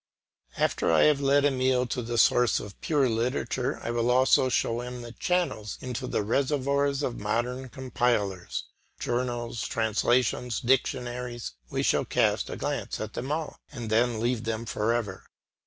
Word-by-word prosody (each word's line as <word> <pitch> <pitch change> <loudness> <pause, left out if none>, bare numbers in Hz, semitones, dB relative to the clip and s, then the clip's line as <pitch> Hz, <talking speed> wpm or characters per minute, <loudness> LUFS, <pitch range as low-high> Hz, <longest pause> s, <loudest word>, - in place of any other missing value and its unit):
After - - +1
I 80 - +5
have 150 -2 +4
led 140 +1 +4
Emile 130 -2 +2
to 125 +1 -3
the 120 0 -3
sources 120 +1 +4
of 100 -1 -10
pure 145 -4 +2
literature, 125 +3 -1
I 115 - -2
will 120 0 +1
also 130 +1 +4
show 120 -1 0
him 125 0 -6
the 120 - -8
channels 165 - -1
into 125 0 -4
the 105 - 0
reservoirs 140 +3 +1
of 120 - -2
modern 120 +5 -2
compilers; 120 -8 -1 0.4
journals, 120 -2 -2
translations, 115 +1 +1
dictionaries, 125 -1 -1 0.2
he - - -1
shall - - +2
cast - - +1
a - - -5
glance - - -3
at 110 0 -5
them 130 +4 -4
all, 155 0 -3
and 120 -6 -6
then 115 0 +2
leave 120 0 0
them 115 0 -3
for 110 0 0
ever. 110 -5 -2
120 Hz, 155 wpm, -27 LUFS, 115-130 Hz, 0.4 s, I